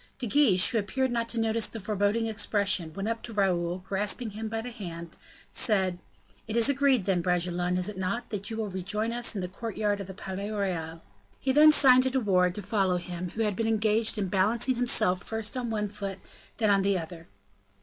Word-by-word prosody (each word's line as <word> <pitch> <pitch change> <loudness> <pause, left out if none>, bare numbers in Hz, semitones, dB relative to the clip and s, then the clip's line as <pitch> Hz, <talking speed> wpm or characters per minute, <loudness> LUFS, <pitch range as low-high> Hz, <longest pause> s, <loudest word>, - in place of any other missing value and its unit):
De 260 - -4
Guiche, 215 -7 +5
who 230 - +1
appeared 260 +6 -1
not 230 -1 -1
to 230 - -1
notice 225 0 +1
the 225 - -8
foreboding 205 +2 0
expression, 205 -5 0
went 195 +1 -3
up 230 0 -2
to 235 - -8
Raoul, 180 -5 0
and 185 - -11
grasping 205 +4 -1
him 220 +2 -5
by 225 +1 -3
the 245 +2 -7
hand, 170 -7 -8 0.4
said, 190 -5 0 0.5
"It 220 +1 -2
is 235 - +6
agreed, 275 -5 +2
then, 185 -2 +1
Bragelonne, 180 0 0
is 180 - 0
it 205 -3 -6
not, 230 +6 -3
that 200 -2 -4
you 220 - -5
will 220 -1 -2
rejoin 205 +4 -2
us 240 -1 0
in 195 - -2
the 180 - -3
courtyard 205 +1 -3
of 195 - -7
the 190 - -9
Palais 195 +1 -5
Royal?" 170 -6 -3 0.4
He 265 - 0
then 305 +3 +7
signed 255 -4 +6
to 260 - +1
De 265 +1 0
Wardes 180 -5 +2
to 210 - -6
follow 190 -2 +1
him, 175 0 -6
who 225 - 0
had 210 -2 -1
been 225 +3 -1
engaged 220 0 +2
in 200 -2 -1
balancing 220 +7 +2
himself 235 -7 +2
first 220 +2 -3
on 245 -2 -3
one 210 -2 -1
foot, 200 -2 -6 0.4
then 215 -3 +2
on 195 -1 +4
the 195 0 +1
other. 165 -1 -8
205 Hz, 220 wpm, -28 LUFS, 185-230 Hz, 0.5 s, then